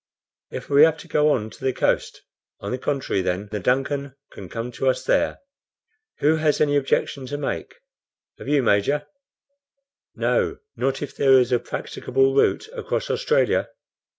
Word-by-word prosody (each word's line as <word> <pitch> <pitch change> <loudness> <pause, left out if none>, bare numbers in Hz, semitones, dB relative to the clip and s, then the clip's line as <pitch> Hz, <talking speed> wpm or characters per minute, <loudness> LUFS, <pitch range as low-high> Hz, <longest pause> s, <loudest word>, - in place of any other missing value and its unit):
If - - -7
we 140 0 +5
have 160 0 +6
to - - -12
go 150 0 +3
on 110 -6 0
to - - -14
the 130 - +2
coast, - - -1 0.4
on 100 - -5
the 125 - -2
contrary, 135 -8 -1
then 95 +3 -2
the 105 - -2
DUNCAN 135 +4 -1 0.2
can 95 -3 -10
come 115 +2 -5
to 130 +3 0
us 130 0 -1
there. - - +1 0.8
Who 155 +2 +4
has 155 -2 +1
any 145 -1 +2
objection 135 -1 0
to 145 - -4
make? 145 - -4 0.6
Have - - -9
you, 145 -2 +2
Major?" 120 +8 +2 1.1
"No, - - 0 0.2
not 135 +1 -1
if 145 - -7
there 135 -1 +4
is 125 -1 +2
a 125 - +3
practicable 135 +3 -1
route 140 - +2
across 475 - -3
Australia." - - +1
135 Hz, 165 wpm, -23 LUFS, 125-145 Hz, 1.1 s, have